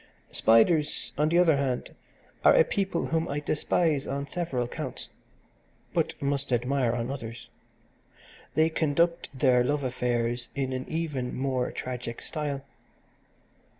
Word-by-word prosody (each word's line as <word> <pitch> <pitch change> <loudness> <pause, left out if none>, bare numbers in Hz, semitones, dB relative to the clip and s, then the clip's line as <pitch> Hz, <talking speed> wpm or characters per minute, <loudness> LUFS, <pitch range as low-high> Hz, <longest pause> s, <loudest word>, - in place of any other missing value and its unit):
"Spiders, 145 +8 +3
on 150 +1 +2
the 170 - +3
other 165 -5 +5
hand, 135 -3 -2 0.5
are - - +7
a - - +7
people 190 -4 -1
whom 165 0 0
I 145 - -2
despise 150 0 +1
on 140 +1 -2
several 140 -7 -2
counts, - - -5 0.8
but - - 0
must 140 -1 -1
admire 125 0 +1
on 120 +1 -2
others. 115 -4 -7 1.1
They 160 +1 +4
conduct 165 +2 +1
their 130 -3 +3
love 145 +2 0
affairs 120 -1 -1
in 135 -2 -1
an 130 0 -4
even 150 -6 -2
more 130 -1 0
tragic 125 -2 -5
style. 145 -3 -3
140 Hz, 130 wpm, -28 LUFS, 125-155 Hz, 1.1 s, are